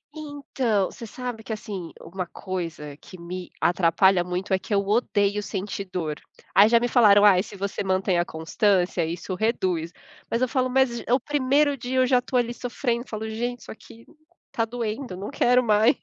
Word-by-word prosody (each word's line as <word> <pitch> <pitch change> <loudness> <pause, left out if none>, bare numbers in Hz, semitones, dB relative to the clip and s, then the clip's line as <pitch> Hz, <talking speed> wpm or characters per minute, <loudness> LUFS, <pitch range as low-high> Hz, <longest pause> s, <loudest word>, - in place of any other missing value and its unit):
Então, 270 -9 -1
você 230 - -9
sabe 245 -1 -6
que - - -8
assim, 200 -5 -5
uma 185 0 -6
coisa 165 -7 -6
que 185 +4 -14
me 180 +1 -7
atrapalha 175 +1 +3
muito, 180 +2 -3
é 190 - +3
que 210 - -13
eu 200 - +4
odeio 205 -2 +1
sentir 200 0 -4
dor. 155 -5 -3 0.3
Aí 205 +2 +7
já 235 0 +5
me 245 - 0
falaram 210 -4 +6
ai, 190 -3 +6
se 205 - -10
você 200 +1 -3
mantém 190 -1 +1
a 175 - +1
constância, 175 +2 +1
isso 170 +3 -4
reduz, 180 -5 -1 0.4
mas 230 - -1
eu - - +2
falo, 255 0 0
mas, 255 -2 +2
o 250 - +4
primeiro 285 +1 +2
dia 255 0 -4
eu 255 - +5
já 250 -1 +4
estou 250 +1 -2
ali 240 -1 0
sofrendo, 240 0 -3
falo 220 0 -5
gente, 240 +2 -3
isso - - -10
aqui 225 +1 -14 0.5
tá 230 - 0
doendo, 225 -3 -4
não 200 +7 -6
quero 250 -3 +3
mais. 215 -1 +4
210 Hz, 185 wpm, -25 LUFS, 185-245 Hz, 0.5 s, Aí